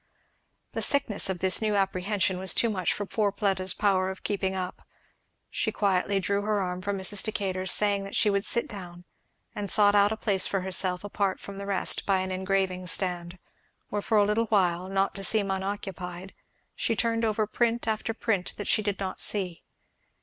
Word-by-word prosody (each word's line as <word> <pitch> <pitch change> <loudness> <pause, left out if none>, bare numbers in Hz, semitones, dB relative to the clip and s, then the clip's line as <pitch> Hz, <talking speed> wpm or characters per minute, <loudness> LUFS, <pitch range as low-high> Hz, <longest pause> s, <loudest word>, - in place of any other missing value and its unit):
The - - -3
sickness 265 -9 +2
of 190 - -1
this 190 +2 +4
new 215 -1 +1
apprehension 195 -1 0
was 190 0 0
too 230 - +3
much 185 -3 0
for 205 - -3
poor 205 0 0
Fleda's 190 -3 -1
power 190 -3 +2
of 190 - -8
keeping 190 -2 -1
up. 185 -1 -4 0.7
She - - -1
quietly 195 0 +1
drew 200 +2 0
her 210 0 0
arm 180 -1 -3
from 200 +1 -2
Mrs. 190 +1 +2
Decatur's, 190 -3 -2
saying 205 -1 +4
that 195 - -7
she - - +2
would 200 0 0
sit 235 +1 +2
down; 180 -4 -9 0.5
and 205 -1 -4
sought 205 0 +6
out 205 0 +4
a 220 - -2
place 200 -3 +1
for 195 - -1
herself 185 0 0
apart 200 -2 -1
from 200 0 -9
the 200 - -6
rest 195 -2 0
by 190 -2 +3
an 185 0 -3
engraving 185 -1 -1
stand; 175 0 0 0.5
where 205 - -2
for 220 - +1
a 205 - +5
little 215 +3 +1
while, 185 -4 +1
not 195 0 +1
to 195 - -7
seem 200 -1 +2
unoccupied, 190 -1 -5 0.4
she 230 - -1
turned 230 0 0
over 215 -1 +1
print 235 +2 -1
after 220 +1 -1
print 200 -5 -1
that 205 - -5
she - - +2
did 205 -2 -2
not 190 -1 -3
see. 185 -5 +1
195 Hz, 195 wpm, -27 LUFS, 185-210 Hz, 0.7 s, sought